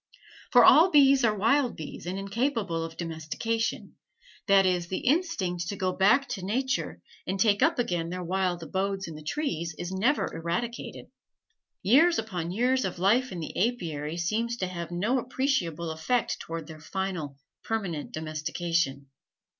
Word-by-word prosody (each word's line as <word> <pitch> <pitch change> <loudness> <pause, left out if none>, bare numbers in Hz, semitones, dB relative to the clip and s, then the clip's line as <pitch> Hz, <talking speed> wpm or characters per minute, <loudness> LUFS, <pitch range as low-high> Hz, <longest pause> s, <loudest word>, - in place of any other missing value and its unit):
For - - +7
all 335 +5 +8
bees 275 -4 +5
are 215 -2 +2
wild 245 +5 +2
bees 160 +2 -8
and 185 +2 -3
incapable 200 -4 -1
of 165 0 -7
domestication; 170 +8 -3 0.5
that 195 -1 +6
is, 180 -2 +1
the 185 - -3
instinct 245 - 0
to 200 - -3
go 185 -2 0
back 230 +10 +4
to 210 -7 -4
nature 260 +7 -2 0.2
and 190 +1 -2
take 205 +1 +3
up 315 +3 +3
again 175 -9 -1
their 180 +1 -4
wild 180 -1 -1
abodes 190 +3 -2
in 165 - -7
the 155 - -9
trees 170 - -3
is 175 +1 -5
never 230 +10 +1
eradicated. 175 +9 -4 0.8
Years 310 - +5
upon 180 -7 -3
years 250 +7 +1
of 185 -2 -3
life 230 +8 +2
in 175 - -5
the 155 - -6
apiary 170 -8 -1
seems 225 +7 -1
to 185 - -1
have 170 -2 -5
no 205 +10 0
appreciable 240 - -1
effect 225 +10 -1
towards 165 -2 -6
their 160 -1 -10
final, 175 -6 -4 0.3
permanent 195 -9 -3
domestication. 155 -2 -2
190 Hz, 155 wpm, -28 LUFS, 170-235 Hz, 0.8 s, all